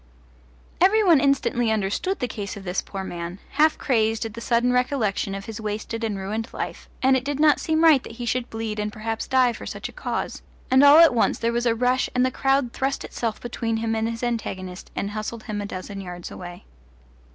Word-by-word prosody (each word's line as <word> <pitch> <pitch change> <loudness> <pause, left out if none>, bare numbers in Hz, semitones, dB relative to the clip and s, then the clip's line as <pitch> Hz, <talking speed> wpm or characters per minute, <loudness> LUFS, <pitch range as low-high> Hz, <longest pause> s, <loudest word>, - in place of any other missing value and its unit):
Every 425 +4 +5
one 340 -7 +6
instantly 270 -4 +2
understood 220 - 0
the 250 - -2
case 205 -4 -6
of 200 - -9
this 180 0 -1
poor 195 -1 -6
man, 175 -1 -6
half 310 +2 +3
crazed 225 -4 +1
at 220 - -6
the 230 - -8
sudden 240 +1 +2
recollection 240 -6 0
of 195 0 -6
his 225 0 -7
wasted 215 +2 -4
and 215 -3 -1
ruined 215 +4 -3
life, - - -5
and 265 0 +5
it 255 - 0
did 285 +1 -3
not 300 -1 +5
seem 320 0 +1
right 310 -5 +7
that 230 - -10
he 240 +1 -6
should 245 +1 -1
bleed 225 -1 -4
and 210 0 -2
perhaps 220 +1 -4
die 255 -2 +3
for - - -8
such - - -5
a - - -14
cause, - - -4 0.3
and 260 +2 +6
all 285 +1 +9
at 330 -4 +8
once 235 - +2
there 230 0 0
was 240 +1 0
a 230 - +2
rush 250 +2 +1
and 250 0 +4
the 255 - 0
crowd 270 -1 +1
thrust 270 +1 -2
itself 225 -3 -3
between 230 -1 -2
him 225 0 -1
and 220 +1 0
his 230 +1 -5
antagonist 190 -6 -4
and 200 - -2
hustled 215 +1 -5
him 210 -2 -4
a 205 - -4
dozen 195 +1 -6
yards 180 -2 -7
away. 175 -1 -9
230 Hz, 220 wpm, -24 LUFS, 210-260 Hz, 0.3 s, all